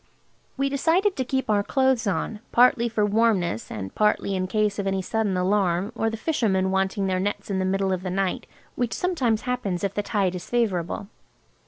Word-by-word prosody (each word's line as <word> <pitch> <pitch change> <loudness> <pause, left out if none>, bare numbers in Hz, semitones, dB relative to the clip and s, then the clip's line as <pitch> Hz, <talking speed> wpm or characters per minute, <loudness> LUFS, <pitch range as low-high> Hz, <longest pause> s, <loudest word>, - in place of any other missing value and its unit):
We 275 +1 +1
decided 330 +8 +2
to 260 - -1
keep 265 +1 -2
our 210 -1 +3
clothes 260 0 +1
on, 210 +2 -2
partly 240 -1 +4
for 215 -2 +1
warmness 205 - +1
and 95 -3 -6
partly 210 -2 +1
in 185 0 -1
case 210 0 0
of 200 - -1
any 195 -1 0
sudden 210 -1 -1
alarm 185 +1 +1
or 225 -1 0
the 225 - -5
fishermen 205 -9 0
wanting 190 +1 0
their 185 -1 0
nets 205 +1 -3
in 190 - 0
the 185 - 0
middle 190 0 +1
of 185 - -2
the 185 - -4
night, 190 0 -1 0.3
which 245 -2 -2
sometimes 260 -12 0
happens 215 -8 -2
if 200 -1 -1
the 205 - -1
tide 200 -3 0
is 180 -1 -7
favourable. 200 -5 -1
205 Hz, 195 wpm, -25 LUFS, 190-235 Hz, 0.3 s, partly